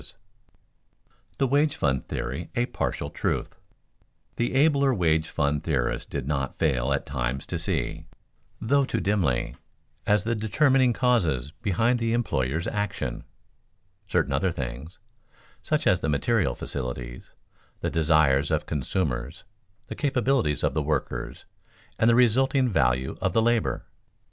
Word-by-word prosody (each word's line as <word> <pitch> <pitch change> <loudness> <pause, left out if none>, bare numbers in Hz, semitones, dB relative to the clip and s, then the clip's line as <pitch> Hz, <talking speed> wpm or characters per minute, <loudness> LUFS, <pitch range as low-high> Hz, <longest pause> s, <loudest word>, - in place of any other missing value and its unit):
[Sidenote: - - -15 1.2
The 135 - +2
wage 145 +3 +2
fund 65 -3 0
theory 80 +7 -4
a 120 - +2
partial - - -3
truth] - - -2 0.8
The 120 +2 -1
abler 140 -2 +4
wage 80 -4 +1
fund 70 0 0
theorists 60 -3 -1
did 70 -2 -4
not 70 -3 -2
fail 70 -4 +1
at 70 - 0
times 65 -1 -3
to - - -3
see, - - -2 0.5
though 140 +5 +2
too 115 -4 -1
dimly, 90 -13 0 0.5
as 105 -1 +3
the 115 +2 0
determining 130 +4 +3
causes 90 - +1
behind 115 +4 +1
the 115 -1 0
employers' 80 - 0
action, 100 -12 -3 0.8
certain 90 -7 +1
other 85 +7 +1
things, 65 +2 -6 0.6
such - - -1
as - - +4
the 80 - -2
material 80 - +1
facilities, 60 -2 -6 0.5
the - - -1
desires 75 -4 +3
of - - 0
consumers, 65 -4 -2 0.4
the - - -6
capabilities 130 - +1
of - - +1
the 80 - 0
workers, 75 -1 -3 0.5
and 115 - +4
the 115 - +5
resulting 130 +2 +3
value 65 - +1
of - - 0
the 115 - +3
labor. 120 -1 +1
85 Hz, 135 wpm, -26 LUFS, -, 1.2 s, the